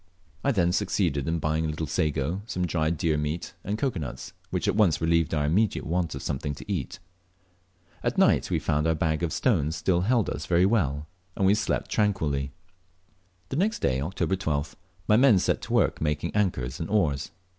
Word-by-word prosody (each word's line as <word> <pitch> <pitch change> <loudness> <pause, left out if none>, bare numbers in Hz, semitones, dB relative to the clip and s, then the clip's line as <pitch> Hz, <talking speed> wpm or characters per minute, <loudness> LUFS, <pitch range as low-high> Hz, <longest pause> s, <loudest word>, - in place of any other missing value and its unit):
I 140 - +3
then 90 -7 +2
succeeded 90 -7 0
in 80 +1 0
buying 80 0 0
a - - 0
little 80 +1 -3
sago, 75 +4 -1
some 90 -5 -1
dried 80 -1 0
deer 80 -1 +1
meat 75 +3 -3
and 105 +2 -2
cocoa 125 -6 -1
nuts, 65 -4 -6 0.2
which - - -2
at - - +2
once 105 -7 +3
relieved 80 -1 +2
our 75 -2 +1
immediate 100 +8 +1
want 85 -2 -1
of 70 - -7
something 70 0 -3
to - - -10
eat. - - -3 1.0
At - - -1
night - - +4
we - - +1
found 75 +2 0
our 80 - +2
bag 80 0 0
of 85 - 0
atones 80 - +1
still 85 +2 +1
held 115 +2 +2
us 75 - -4
very 90 +1 +4
well, 75 -9 +1 0.3
and 95 - +1
we 95 - +5
slept 105 - -1
tranquilly. 75 -10 0 1.0
The 135 - -3
next 210 +6 +1
day 65 -1 0
(October 95 +4 -1
12th), 75 -6 -2 0.3
my 105 - +5
men 125 -4 +6
set - - +1
to - - -5
work - - +2
making 75 +3 -1
anchors 70 -11 0
and 80 - -4
oars. 80 -10 +1
80 Hz, 195 wpm, -26 LUFS, 75-95 Hz, 1.0 s, men